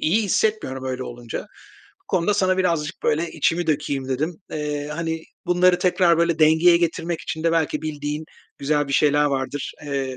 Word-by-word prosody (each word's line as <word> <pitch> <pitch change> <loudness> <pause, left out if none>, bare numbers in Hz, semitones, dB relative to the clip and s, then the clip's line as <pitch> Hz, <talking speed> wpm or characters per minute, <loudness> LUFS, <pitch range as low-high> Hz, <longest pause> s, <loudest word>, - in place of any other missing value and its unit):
iyi 205 +8 +2
hissetmiyorum 200 -10 0
öyle 130 0 -3
olunca. 120 -1 -6 0.6
Bu - - -59
konuda 185 +3 +1
sana 185 -2 +2
birazcık 170 -3 0
böyle 160 +3 +1
içimi 165 +2 0
dökeyim 140 -3 -1
dedim. 155 +6 -1 0.2
Eee, 150 -1 -3
hani, 165 0 -3 0.2
bunları 180 0 +4
tekrar 180 -2 +3
böyle 170 -1 +2
dengeye 160 +3 +6
getirmek 170 0 -1
için 160 - -5
de 165 - +3
belki 155 -2 0
bildiğin 150 0 -4 0.3
güzel 145 0 0
bir - - -3
şeyler 150 0 +4
vardır, 135 0 -2
eee, 135 -2 -3
155 Hz, 165 wpm, -22 LUFS, 145-170 Hz, 0.6 s, dengeye